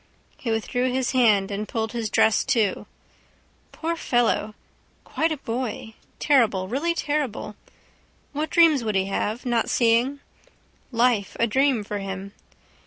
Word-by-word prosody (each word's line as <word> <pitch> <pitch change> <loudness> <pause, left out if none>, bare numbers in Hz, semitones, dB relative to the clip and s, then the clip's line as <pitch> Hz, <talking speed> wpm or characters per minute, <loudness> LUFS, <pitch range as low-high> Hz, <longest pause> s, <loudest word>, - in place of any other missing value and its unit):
He 240 - -6
withdrew 245 +3 0
his 260 -1 0
hand 215 -6 +3
and 205 +1 -3
pulled 220 -1 -3
his 230 -3 -3
dress 215 +1 +3
to. 225 -8 0 0.8
Poor 335 +1 -3
fellow! 235 -7 0 0.5
Quite 325 +1 -1
a 310 - -2
boy. 230 -3 -4 0.2
Terrible. 225 -10 +2
Really 300 - -1
terrible. 290 -8 -2 0.8
What 300 +2 -2
dreams 320 -7 +4
would 215 -2 -2
he 190 0 +2
have, 210 +5 -3
not 240 -2 0
seeing? 240 +4 +2 0.7
Life 230 -4 +1
a 230 - +4
dream 260 0 +2
for 205 0 -4
him. 195 0 -6
235 Hz, 135 wpm, -24 LUFS, 210-270 Hz, 0.8 s, dreams